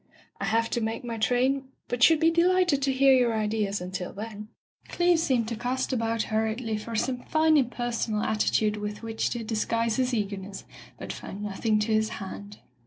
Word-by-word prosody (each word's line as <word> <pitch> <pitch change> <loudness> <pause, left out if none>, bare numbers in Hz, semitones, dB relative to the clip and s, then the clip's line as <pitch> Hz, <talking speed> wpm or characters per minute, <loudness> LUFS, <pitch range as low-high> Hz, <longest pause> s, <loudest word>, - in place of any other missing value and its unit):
"I 200 - -2
have 225 +2 +1
to 240 - 0
make 225 +2 -3
my 230 -2 -5
train, 260 +4 +1 0.2
but 245 0 -3
should 320 +5 +6
be 325 +1 +4
delighted 350 -3 +3
to 270 0 +2
hear 270 +1 +5
your 245 -3 +3
ideas 210 -2 -1
until 180 0 -5
then. 210 0 -7 0.4
Cleeve 350 -1 +2
seemed 255 -8 +1
to 230 - -3
cast 255 +4 -2
about 230 -2 0
hurriedly 220 +1 -1
for 230 +2 -6
some 250 +3 -1
fine 315 0 +3
impersonal 240 -5 0
attitude 215 0 +1
with 210 +1 -5
which 225 -1 -1
to 240 -2 -4
disguise 230 0 0
his 255 -1 +1
eagerness, 200 -3 -4 0.3
but - - -6
found 200 +2 -8
nothing 210 +2 0
to 220 +1 0
his 215 0 +2
hand. 200 +1 -8
230 Hz, 180 wpm, -27 LUFS, 215-255 Hz, 0.4 s, should